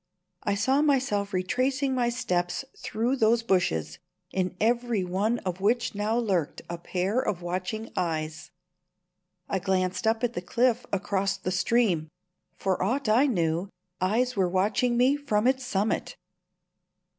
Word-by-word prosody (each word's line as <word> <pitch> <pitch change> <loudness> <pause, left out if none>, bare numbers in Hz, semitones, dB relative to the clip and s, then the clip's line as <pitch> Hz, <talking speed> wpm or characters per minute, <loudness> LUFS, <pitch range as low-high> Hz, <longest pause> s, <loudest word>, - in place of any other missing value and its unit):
I 200 - 0
saw 260 +8 +2
myself 260 -9 +1
retracing 260 +9 0
my 245 -2 +1
steps 180 -3 -1
through 240 +5 -1
those 230 0 +3
bushes, 80 - 0 0.3
in 185 -1 -1
every 235 -2 +1
one 200 +6 0
of 185 0 -3
which 230 +4 +1
now 210 +3 0
lurked 190 -10 -1
a 170 0 -5
pair 185 +6 -1
of 180 -7 -2
watching 185 +6 -3
eyes. 155 -3 -2 1.0
I 195 - -1
glanced 185 +2 0
up 225 +1 +1
at 240 -1 +1
the 175 - -3
cliff 240 +5 +1
across 195 0 0
the 185 -1 -3
stream. 185 -5 +2 0.5
For 190 -2 -1
aught 240 +8 0
I 245 +7 +5
knew, 170 - 0 0.3
eyes 235 +7 +1
were 190 -3 +2
watching 210 +6 +1
me 260 +4 +4
from 225 -7 0
its 260 0 +2
summit. 205 -2 -1
205 Hz, 145 wpm, -27 LUFS, 185-240 Hz, 1.0 s, I